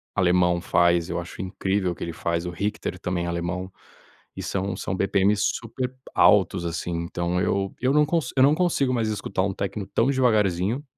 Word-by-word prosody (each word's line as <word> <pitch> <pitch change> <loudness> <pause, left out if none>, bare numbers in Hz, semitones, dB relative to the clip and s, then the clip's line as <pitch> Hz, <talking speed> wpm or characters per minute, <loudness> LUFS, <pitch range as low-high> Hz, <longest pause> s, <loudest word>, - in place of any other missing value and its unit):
Alemão 90 -1 +3
faz 85 -1 +2
eu - - -2
acho 85 +3 -7
incrível 95 0 -1
o - - -5
que - - -7
ele 85 - -4
faz 85 +1 -2
o - - -2
Hicter 105 0 -3
também 90 -1 -2
alemão 85 +2 -3 0.6
e - - -5
são 95 0 -2
são - - -3
BPMs 100 +2 +2
super 125 +3 -4 0.2
altos, - - +4
assim, 85 +1 -3
então 85 +1 -2
eu 95 +1 0
eu 130 +2 +2
não 150 0 +5
consi 165 0 -1
eu 130 - +6
não 145 +3 +5
consigo 155 -7 +1
mais 115 -3 0
escutar 100 -3 -2
um 95 0 -1
techno 100 +1 -4
tão 115 - +1
devagarzinho 110 -3 +1
95 Hz, 185 wpm, -24 LUFS, 85-115 Hz, 0.6 s, eu